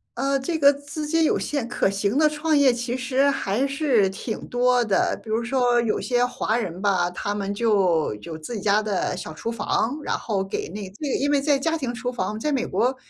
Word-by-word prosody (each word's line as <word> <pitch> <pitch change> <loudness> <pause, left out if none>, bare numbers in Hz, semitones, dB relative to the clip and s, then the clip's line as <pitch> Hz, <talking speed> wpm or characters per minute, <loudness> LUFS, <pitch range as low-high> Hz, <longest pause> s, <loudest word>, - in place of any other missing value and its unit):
呃， 275 +2 0
这 320 +5 -2
个 285 -2 +6
资 285 +2 -6
金 325 +1 +2
有 - - +2
限 285 -5 -2
可 240 - +1
行 200 +4 -1
的 305 0 +5
创 305 +1 +1
业 280 -2 +6
其 240 0 -3
实 260 +2 +2
还 260 -1 0
是 270 -8 +2
挺 215 +4 -6
多 245 0 +2
的。 200 -3 +1
比 225 - -12
如 225 +2 0
说 245 -1 +2
有 230 - 0
些 245 -1 +1
华 235 -2 -1
人 185 -6 -4
吧， 185 -4 +2
他 205 +3 -3
们 200 0 -2
就 195 - +2
有 160 +7 -7
自 160 +9 -7
己 210 - -4
家 205 +2 +3
的 200 -3 -1
小 160 - -6
厨 225 +9 -4
房， 235 +3 -1
然 - - -1
后 200 -4 -2
给 195 - -4
那 200 +1 -6
对， 280 +9 -5
因 285 - +1
为 285 - +3
在 285 -1 +2
家 325 +3 0
庭 260 -6 -3
厨 245 0 -3
房 215 -2 -3
在 300 +6 -1
美 260 -3 0
国， 255 +3 0
240 Hz, 245 characters per minute, -24 LUFS, 205-275 Hz, -, 个